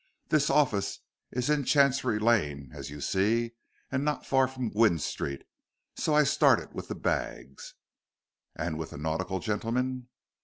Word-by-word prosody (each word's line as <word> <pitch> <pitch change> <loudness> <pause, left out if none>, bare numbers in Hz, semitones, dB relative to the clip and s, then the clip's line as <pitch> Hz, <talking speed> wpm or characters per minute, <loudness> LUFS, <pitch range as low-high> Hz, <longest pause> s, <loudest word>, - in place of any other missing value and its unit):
This 150 -1 +3
office 130 -9 +1 0.3
is 125 0 -2
in 150 -1 +2
Chancery 135 -4 +3
Lane, 75 - +1
as - - -7
you 75 0 -8
see, 115 +7 +1 0.4
and 130 +1 0
not 150 -1 -1
far 135 -1 +3
from 130 -4 -4
Gwynne 105 -5 +4
Street, 70 -2 -4 0.5
so 155 - 0
I 150 - +6
started 140 - +3
with - - -6
the - - -4
bags." 65 +1 -3 0.8
"And 80 -3 -3
with 80 - -4
the - - -9
nautical 80 +5 -2
gentleman?" 125 +5 -2
115 Hz, 150 wpm, -29 LUFS, 85-130 Hz, 0.8 s, I